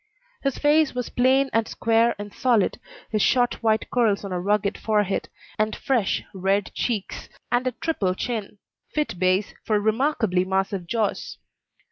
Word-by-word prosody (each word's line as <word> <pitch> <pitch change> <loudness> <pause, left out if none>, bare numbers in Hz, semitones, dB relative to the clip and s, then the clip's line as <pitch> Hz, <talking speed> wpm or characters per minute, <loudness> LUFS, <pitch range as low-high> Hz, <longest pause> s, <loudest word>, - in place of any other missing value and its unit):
His 275 -2 -1
face 295 -1 +3
was 250 -1 -3
plain 265 +2 +3
and 225 -1 +2
square 230 +1 +2
and 205 0 -8
solid, 235 -6 +1 0.3
with 215 - +2
short 245 +2 +2
white 220 -1 +1
curls 220 -5 +2
on 195 - -6
a 180 - -1
rugged 205 +1 +1
forehead, 210 -3 0 0.3
and 215 0 +1
fresh 240 -7 0
red 195 +1 0
cheeks, 220 -5 -3 0.2
and 245 +1 +1
a 255 - -1
triple 205 - -1
chin 215 -2 -4 0.4
fit 300 - -1
base 185 +2 +1
for 215 -2 +1
remarkably 220 -4 +1
massive 190 -1 -1
jaws. 220 -2 -2
220 Hz, 150 wpm, -24 LUFS, 195-245 Hz, 0.4 s, face